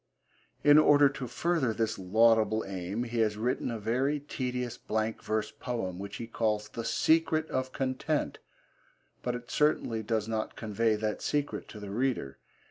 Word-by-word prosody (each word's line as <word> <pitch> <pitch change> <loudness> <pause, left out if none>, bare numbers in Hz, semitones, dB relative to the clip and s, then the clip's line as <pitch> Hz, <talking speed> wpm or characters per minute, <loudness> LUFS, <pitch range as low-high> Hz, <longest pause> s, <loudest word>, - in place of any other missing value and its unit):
In 145 +1 +8
order 145 -1 +6
to 135 -2 -6
further 135 -3 0
this 110 -1 -1
laudable 110 +3 +3
aim 95 +4 -3
he 120 -1 -3
has 105 -2 +2
written 125 +3 -1
a 115 - -3
very 130 +7 0
tedious 125 -4 -3
blank 110 +1 -2
verse 110 0 -1
poem 105 -8 -4
which 100 +1 -6
he 115 - -5
calls 110 -2 -1
The 115 - -5
Secret 160 +5 +2
of 130 0 -1
Content, 135 +4 -1 0.8
but 125 -1 -2
it 120 0 -8
certainly 135 -7 +1
does 110 -1 -1
not 110 -1 -2
convey 110 0 +1
that 105 0 -2
secret 145 -1 -1
to 105 - -9
the 100 -1 -7
reader. 115 - -1
115 Hz, 160 wpm, -30 LUFS, 110-130 Hz, 0.8 s, In